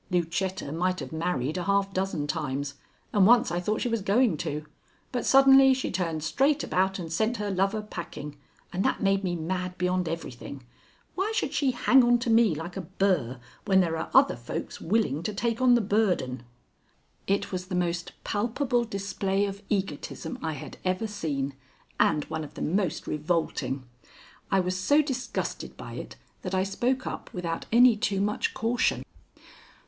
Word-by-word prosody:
Lucetta 180 -2 -1
might 180 +3 0
have 135 -3 -6
married 160 -1 -1
a 175 - -4
half 200 0 +1
dozen 190 -6 -1
times, 145 -2 -2 0.4
and 195 -2 +5
once 245 +1 +5
I 175 - 0
thought 210 +5 -1
she - - 0
was 230 -2 0
going 210 0 +3
to, 150 +1 -4 0.5
but 245 - -2
suddenly 270 0 +7
she 260 - -3
turned 165 -4 -2
straight 275 - +2
about 190 +1 +1
and 165 -3 -5
sent 220 +7 +1
her 205 -1 -2
lover 195 +3 0
packing, 170 -7 -7 0.4
and 185 +2 0
that - - 0
made 195 0 +2
me 175 -2 -1
mad 180 +2 -3
beyond 180 -1 0
everything. 140 -4 -6 0.5
Why 390 +4 -1
should - - -1
she 280 - +2
hang 255 +1 +5
on 240 0 +5
to 235 0 -1
me 225 -7 +5
like 165 +4 -6
a 195 - -3
burr 165 -9 0 0.3
when 190 -2 +4
there 170 -3 +2
are 160 - -4
other 270 +1 +5
folks 120 - -6
willing 170 -6 +1
to 205 +4 -4
take 230 +3 -1
on 250 -1 +6
the 240 - +3
burden?" 185 - 0 0.8
It 200 +1 0
was 185 -1 -4
the 185 - -3
most 175 -1 -1
palpable 240 +3 0
display 200 -1 -1
of 200 0 -5
egotism 190 -4 -3
I 160 -1 -2
had 145 - -8
ever 185 +4 0
seen 150 -10 -3 0.5
and 150 - +3
one 160 0 -4
of 150 - -10
the - - -4
most 185 +2 0
revolting. 150 -3 -1 0.7
I 195 -1 +3
was 180 0 -1
so 285 +12 +3
disgusted 265 -3 -4
by - - -8
it - - -7 0.3
that 185 0 -3
I 185 - +2
spoke 245 +7 -1
up - - -6
without 170 -2 -3
any 240 0 +7
too 205 -3 -1
much 210 +1 0
caution. 230 +3 +1
190 Hz, 175 wpm, -27 LUFS, 165-225 Hz, 0.8 s, suddenly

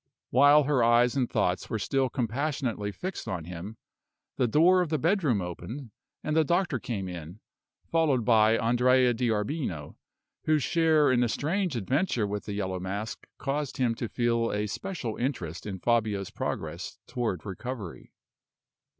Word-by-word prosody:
While 145 +4 +6
her 135 -3 +2
eyes 120 +2 +4
and 130 -3 +1
thoughts 90 +1 0
were 110 - -1
still 135 +4 0
compassionately 125 -3 -2
fixed 185 - -6
on 85 -4 -3
him, 90 +6 -7 0.6
the 125 - +2
door 175 +9 +5
of 175 - -1
the 155 - +1
bedroom 155 - +2
opened, 100 - -7 0.3
and 155 - -1
the 160 - +5
doctor 170 -4 +1
came 100 -6 -4
in, 90 +2 -8 0.5
followed 150 -8 +1
by 110 -1 +5
Andrea 125 +1 +3
D'Arbino, 110 - -2 0.5
whose 155 -3 +3
share 160 -3 +3
in 125 - +3
the 120 -1 +2
strange 175 - -1
adventure 125 - 0
with 100 0 -4
the 105 - -4
Yellow 95 -2 -2
Mask 100 +4 -5
caused 145 0 -3
him 125 -4 +2
to 115 0 -4
feel 115 -1 +1
a 105 +1 -1
special 130 - -4
interest 105 - -3
in 95 -2 -4
Fabio's 105 -2 0
progress - - -4
toward 120 - -3
recovery. 105 -1 -6
120 Hz, 150 wpm, -28 LUFS, 105-145 Hz, 0.6 s, While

